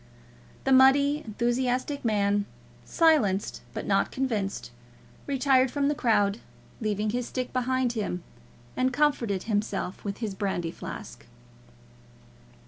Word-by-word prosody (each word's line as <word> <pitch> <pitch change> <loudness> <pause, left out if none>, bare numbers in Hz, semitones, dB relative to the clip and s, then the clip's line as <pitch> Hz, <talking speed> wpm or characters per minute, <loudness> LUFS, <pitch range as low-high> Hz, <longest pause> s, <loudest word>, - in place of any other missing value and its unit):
The 270 - 0
muddy 275 +3 +5
enthusiastic 250 +5 -1
man, 205 -2 +1 0.4
silenced 290 - +2
but - - -5
not - - +2
convinced, 215 - -2 0.6
retired 265 -1 +3
from 285 +2 0
the - - +2
crowd, 210 -5 +2 0.4
leaving 210 0 -1
his 245 +1 -2
stick 255 -1 -4
behind 255 -1 0
him, 200 -6 -3 0.5
and 255 0 +1
comforted 245 -9 +1
himself 205 -3 -2
with 200 -1 -4
his 220 -4 -3
brandy 190 -4 -2
flask. - - -9
240 Hz, 115 wpm, -27 LUFS, 205-265 Hz, 0.6 s, muddy